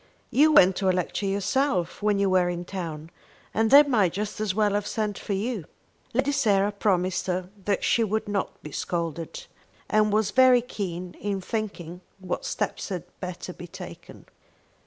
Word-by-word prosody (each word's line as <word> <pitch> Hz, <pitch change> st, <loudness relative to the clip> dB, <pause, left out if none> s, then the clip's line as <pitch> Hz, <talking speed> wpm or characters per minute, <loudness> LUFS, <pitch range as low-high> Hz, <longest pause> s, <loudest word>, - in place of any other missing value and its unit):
You 305 Hz, +3 st, +5 dB
went 190 Hz, -10 st, +6 dB
to 190 Hz, -1 st, +1 dB
a -, -, +6 dB
lecture 185 Hz, +2 st, -1 dB
yourself 200 Hz, -1 st, 0 dB
when 210 Hz, -1 st, +2 dB
you 200 Hz, 0 st, +2 dB
were 185 Hz, -1 st, +3 dB
in 175 Hz, 0 st, -4 dB
town, 165 Hz, -4 st, -6 dB, 0.4 s
and 225 Hz, +1 st, +2 dB
they 285 Hz, +4 st, +9 dB
might 215 Hz, -, +2 dB
just 210 Hz, +2 st, -4 dB
as 205 Hz, -3 st, -1 dB
well 210 Hz, -1 st, +2 dB
have 205 Hz, 0 st, -1 dB
sent 210 Hz, -2 st, -2 dB
for 205 Hz, -, -3 dB
you." 205 Hz, -2 st, -2 dB, 0.5 s
Lady 265 Hz, +4 st, +1 dB
Sarah 205 Hz, -6 st, +2 dB
promised 185 Hz, -3 st, 0 dB
her 185 Hz, 0 st, -2 dB
that 200 Hz, -2 st, 0 dB
she 235 Hz, -, +3 dB
should 220 Hz, 0 st, 0 dB
not 205 Hz, -2 st, -3 dB
be 150 Hz, -, -8 dB
scolded, 170 Hz, -, -4 dB, 0.4 s
and 215 Hz, -1 st, +3 dB
was 215 Hz, 0 st, +2 dB
very 255 Hz, -2 st, +6 dB
keen 180 Hz, -6 st, -5 dB
in 200 Hz, -1 st, -1 dB
thinking 180 Hz, -4 st, -5 dB, 0.2 s
what 190 Hz, -, -4 dB
steps -, -, -3 dB
had 185 Hz, -3 st, -3 dB, 0.2 s
better 180 Hz, 0 st, -6 dB
be 175 Hz, -, -10 dB
taken. -, -, -11 dB
200 Hz, 175 wpm, -26 LUFS, 180-215 Hz, 0.5 s, they